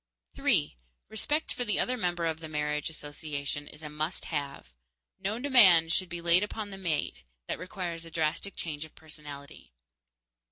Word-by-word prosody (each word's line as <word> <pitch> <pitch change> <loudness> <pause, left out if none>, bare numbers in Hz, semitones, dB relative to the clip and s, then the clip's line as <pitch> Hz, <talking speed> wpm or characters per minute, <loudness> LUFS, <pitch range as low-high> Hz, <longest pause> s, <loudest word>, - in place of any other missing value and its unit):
_3. 75 -4 +3 0.3
Respect 295 +8 0
for 245 - -1
the 210 -4 +2
other 255 - +3
member 175 -6 0
of 160 -1 0
the 160 -1 -7
marriage 150 0 -1
association 145 -1 -4
is 150 +1 -11
a - - -4
must 155 +4 -2
have. 145 - -4 0.5
No 200 +3 -1
demand 205 - +7
should 185 -2 +1
be 175 0 -5
laid 170 +1 +5
upon 210 0 -3
the 195 - -6
mate 155 - -1 0.2
that - - -2
requires 180 -3 -4
a 165 - -9
drastic 165 +4 -1
change 150 -2 -3
of 160 - -12
personality. 145 - -10
165 Hz, 165 wpm, -30 LUFS, 150-185 Hz, 0.5 s, demand